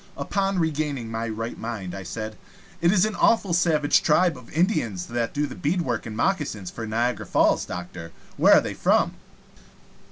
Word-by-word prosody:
Upon 195 Hz, -1 st, -1 dB
regaining 150 Hz, -7 st, -1 dB
my 115 Hz, 0 st, -3 dB
right 115 Hz, +1 st, -5 dB
mind, 110 Hz, -6 st, -5 dB
I 95 Hz, -, -6 dB
said: 110 Hz, +4 st, -6 dB, 0.5 s
"It 170 Hz, +1 st, +4 dB
is 190 Hz, -2 st, +4 dB
an 215 Hz, -, -2 dB
awful 200 Hz, -4 st, +2 dB
savage 155 Hz, -4 st, +3 dB
tribe 170 Hz, +1 st, +3 dB
of 125 Hz, -3 st, -13 dB
Indians 140 Hz, -, 0 dB
that 120 Hz, -1 st, -2 dB
do 145 Hz, +1 st, -1 dB
the -, -, -7 dB
beadwork 145 Hz, -8 st, -1 dB
and 110 Hz, -1 st, -6 dB
moccasins 130 Hz, -, -1 dB
for 115 Hz, -1 st, -6 dB
Niagara 115 Hz, -1 st, -1 dB
Falls, -, -, +2 dB
doctor. 90 Hz, -2 st, -7 dB, 0.2 s
Where -, -, +6 dB
are -, -, +6 dB
they -, -, -4 dB
from?" -, -, +2 dB
120 Hz, 170 wpm, -24 LUFS, 110-170 Hz, 0.5 s, Where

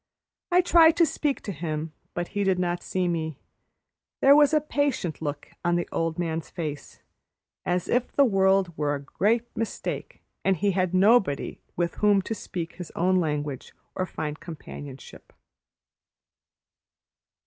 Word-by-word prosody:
I 360 Hz, +1 st, +6 dB
tried 330 Hz, -2 st, +6 dB
to 335 Hz, -, +6 dB
speak 290 Hz, -1 st, -1 dB
to 205 Hz, -, -5 dB
him, 155 Hz, -2 st, -4 dB, 0.2 s
but 175 Hz, 0 st, -2 dB
he 205 Hz, 0 st, -1 dB
did 190 Hz, -2 st, +2 dB
not 175 Hz, -1 st, -1 dB
see 185 Hz, -1 st, -1 dB
me. 160 Hz, -4 st, -2 dB, 0.8 s
There 275 Hz, +1 st, +7 dB
was 295 Hz, -1 st, +6 dB
a 310 Hz, -, +4 dB
patient 285 Hz, -, -1 dB
look 145 Hz, -2 st, -4 dB
on 175 Hz, 0 st, +2 dB
the 175 Hz, -, -1 dB
old 165 Hz, -1 st, -1 dB
man's 165 Hz, -2 st, -2 dB
face, 155 Hz, -5 st, -6 dB, 0.6 s
as 180 Hz, 0 st, 0 dB
if 245 Hz, 0 st, +1 dB
the 280 Hz, -, +4 dB
world 190 Hz, -5 st, +3 dB
were 145 Hz, -2 st, 0 dB
a -, -, -4 dB
great 215 Hz, +10 st, +1 dB
mistake 225 Hz, -1 st, -4 dB, 0.2 s
and 195 Hz, -1 st, +2 dB
he 200 Hz, +4 st, +2 dB
had 185 Hz, -1 st, 0 dB
nobody 195 Hz, -, +3 dB, 0.2 s
with 170 Hz, -1 st, 0 dB
whom 205 Hz, -2 st, +4 dB
to 225 Hz, -, -3 dB
speak 175 Hz, -5 st, -5 dB
his 180 Hz, -3 st, -7 dB
own 185 Hz, +2 st, +2 dB
language 150 Hz, -5 st, -2 dB, 0.2 s
or 185 Hz, -, -2 dB
find 150 Hz, -2 st, -5 dB
companionship. 145 Hz, -4 st, -10 dB
180 Hz, 150 wpm, -26 LUFS, 160-210 Hz, 0.8 s, There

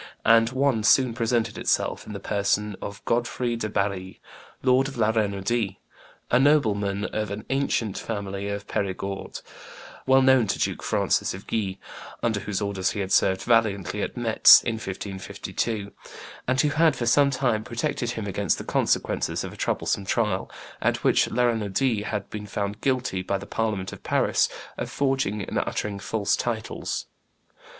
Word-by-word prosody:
And 115 Hz, 0 st, +6 dB
one 130 Hz, -2 st, +1 dB
soon 125 Hz, +1 st, +4 dB
presented 115 Hz, -1 st, 0 dB
himself -, -, 0 dB
in 105 Hz, -, -6 dB
the 100 Hz, -, -5 dB
person 105 Hz, +1 st, 0 dB
of 100 Hz, 0 st, -7 dB
Godfrey 120 Hz, 0 st, 0 dB
de 110 Hz, -2 st, -3 dB
Barri, 100 Hz, -2 st, -2 dB, 0.4 s
Lord 130 Hz, +1 st, +4 dB
of 135 Hz, -, -8 dB
La 110 Hz, -1 st, +3 dB
Renaudie, 100 Hz, -1 st, 0 dB, 0.6 s
a 125 Hz, -, +5 dB
nobleman 105 Hz, -8 st, +2 dB
of 105 Hz, -1 st, -3 dB
an 100 Hz, +1 st, -6 dB
ancient 125 Hz, -6 st, 0 dB
family 100 Hz, -2 st, -4 dB
of 100 Hz, 0 st, -4 dB
Perigord, 95 Hz, 0 st, -3 dB, 0.7 s
well 130 Hz, 0 st, +5 dB
known 130 Hz, -4 st, +5 dB
to -, -, 0 dB
Duke -, -, -1 dB
Francis -, -, 0 dB
of 95 Hz, -, -11 dB
Guise, 100 Hz, -4 st, -2 dB, 0.5 s
under 110 Hz, -3 st, +1 dB
whose 100 Hz, 0 st, -3 dB
orders 100 Hz, -2 st, 0 dB
he -, -, -4 dB
had 95 Hz, -1 st, -3 dB
served 95 Hz, -1 st, +3 dB
valiantly 105 Hz, -4 st, +1 dB
at -, -, -4 dB
Metz 115 Hz, -2 st, +7 dB
in 115 Hz, -2 st, -2 dB
1552, 100 Hz, +1 st, -4 dB, 0.6 s
and 130 Hz, +1 st, +1 dB
who 150 Hz, -, +4 dB
had 160 Hz, +2 st, +3 dB
for 120 Hz, -, -2 dB
some 140 Hz, +4 st, +4 dB
time 125 Hz, -5 st, 0 dB
protected 120 Hz, +1 st, -2 dB
him 110 Hz, -3 st, -4 dB
against 100 Hz, -2 st, 0 dB
the -, -, -6 dB
consequences -, -, 0 dB
of -, -, -6 dB
a -, -, -11 dB
troublesome 100 Hz, -, -1 dB
trial, 105 Hz, -3 st, 0 dB, 0.3 s
at -, -, 0 dB
which -, -, +3 dB
La 125 Hz, -, +1 dB
Renaudie 115 Hz, 0 st, +1 dB
had 105 Hz, -2 st, -3 dB
been 105 Hz, -1 st, -6 dB
found 100 Hz, +1 st, -3 dB
guilty 125 Hz, -8 st, 0 dB
by 100 Hz, +2 st, -1 dB
the 100 Hz, -, -9 dB
Parliament 105 Hz, -4 st, -2 dB
of -, -, -10 dB
Paris -, -, +2 dB, 0.3 s
of -, -, -3 dB
forging 135 Hz, -7 st, 0 dB
and -, -, -2 dB
uttering 100 Hz, -1 st, -3 dB
false 105 Hz, 0 st, 0 dB
titles. 115 Hz, -2 st, -3 dB
110 Hz, 165 wpm, -25 LUFS, 100-120 Hz, 0.7 s, Metz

